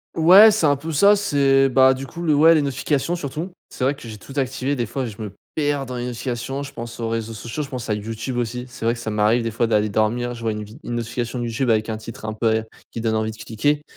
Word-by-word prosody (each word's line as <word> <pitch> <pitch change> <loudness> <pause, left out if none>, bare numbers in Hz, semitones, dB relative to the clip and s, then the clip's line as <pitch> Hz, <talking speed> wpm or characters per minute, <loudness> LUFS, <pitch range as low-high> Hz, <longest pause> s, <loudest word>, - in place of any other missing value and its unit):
Ouais 190 +7 +8
c'est 205 -7 +1
un 145 -1 +4
peu 160 +4 -6
ça, 200 +7 +6
c'est, 135 -8 +3
bah, 130 +1 +5
du 135 +1 -6
coup 170 +4 -9
le 155 -4 +2
ouais 160 +3 +7
les 155 - +3
notifications 140 +4 -1
surtout. 160 +3 -5 0.2
C'est 130 - -3
vrai 140 +2 +1
que - - -16
j'ai 110 - -8
tout 135 - -12
activé, 135 +1 -1
des 120 -2 -1
fois 130 +4 -3
je 110 -1 -8
me 105 -3 -6 0.2
perds 145 -2 0
dans 125 0 -6
les 120 0 -3
notifications, 125 +2 -4
je 140 0 -9
pense 115 -1 -8
aux 115 - -2
réseaux 115 0 -3
sociaux, 115 +7 -5
je 140 - -9
pense 125 -3 -6
à - - +2
YouTube 110 +4 -4
aussi. 125 +1 -2
C'est 125 -2 -11
vrai 115 +1 +2
que 115 - -8
ça 115 - -4
m'arrive 105 +3 +2
des 115 -1 -2
fois 115 +1 0
d'aller 105 -1 +2
dormir, 115 +4 0
je 115 - -9
vois 115 -1 0
une 105 0 -5
vide 110 +8 -14
une 120 - -4
notification 120 +1 -3
YouTube 120 +2 -1
avec 110 0 +2
un 110 - -2
titre 110 0 -9
un 110 - -3
peu 110 0 +1 0.3
qui 115 - -5
donne 110 -1 0
envie 110 0 -1
de 110 - -12
cliquer 145 +8 -1
120 Hz, 275 wpm, -22 LUFS, 115-140 Hz, 0.3 s, Ouais